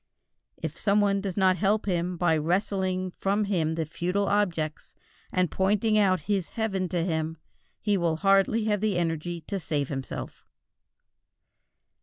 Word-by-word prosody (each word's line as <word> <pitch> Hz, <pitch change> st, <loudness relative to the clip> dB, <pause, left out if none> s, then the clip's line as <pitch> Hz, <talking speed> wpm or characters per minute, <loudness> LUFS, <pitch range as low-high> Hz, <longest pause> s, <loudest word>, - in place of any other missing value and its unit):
If -, -, -5 dB
some 205 Hz, 0 st, +3 dB
one 200 Hz, -1 st, +2 dB
does 195 Hz, -2 st, -4 dB
not 185 Hz, -2 st, +4 dB
help 205 Hz, +4 st, +1 dB
him 180 Hz, -2 st, -1 dB
by 170 Hz, -2 st, +3 dB
wresting 185 Hz, +3 st, 0 dB
from 200 Hz, +2 st, +1 dB
him 165 Hz, -6 st, 0 dB
the 160 Hz, -1 st, -1 dB
futile 180 Hz, +6 st, -1 dB
objects, 170 Hz, -7 st, -1 dB, 0.4 s
and 185 Hz, -2 st, +1 dB
pointing 210 Hz, +3 st, +2 dB
out 190 Hz, -3 st, +3 dB
his 195 Hz, -4 st, -1 dB
heaven 195 Hz, -5 st, -2 dB
to 170 Hz, 0 st, 0 dB
him, 160 Hz, -2 st, -2 dB, 0.4 s
he 205 Hz, -1 st, +2 dB
will 170 Hz, -3 st, +1 dB
hardly 195 Hz, +5 st, +3 dB
have 210 Hz, -2 st, 0 dB
the 210 Hz, -4 st, +1 dB
energy 170 Hz, 0 st, -2 dB
to 195 Hz, +5 st, -4 dB
save 145 Hz, -5 st, -2 dB
himself. 135 Hz, -2 st, -6 dB
185 Hz, 150 wpm, -27 LUFS, 165-200 Hz, 0.4 s, not